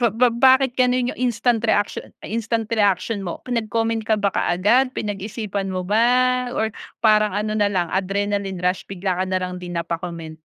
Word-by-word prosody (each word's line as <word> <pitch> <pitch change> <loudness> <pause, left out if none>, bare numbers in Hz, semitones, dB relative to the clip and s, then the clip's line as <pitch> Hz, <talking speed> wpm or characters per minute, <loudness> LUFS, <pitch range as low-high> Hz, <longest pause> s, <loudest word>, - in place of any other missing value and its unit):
ba 240 - +4
ba 230 +5 +3
bakit 260 +2 +4
ganun 250 0 +2
yung - - -12
instant 240 -1 +1
reactio 205 -2 +1 0.2
instant 225 0 -2
reaction 205 0 +1
mo? 175 -3 -5
Pinag-comment 225 -1 -1
ka 220 0 +1
ba 200 -2 0
kaagad? 220 +9 +2
Pinag-isipan 205 -1 -4
mo 185 -1 -3
ba? 250 +4 +3
Or 220 -1 0 0.3
parang 215 -1 +5
ano 215 +1 -1
nalang, 200 -5 0
adrenaline 195 0 -1
rush, 180 +1 -1
bigla 185 -1 -2
ka - - +2
nalang 185 -1 -2
din 175 -1 -6
napa 170 0 -2
comment? 165 -2 -7
210 Hz, 165 wpm, -22 LUFS, 185-230 Hz, 0.3 s, parang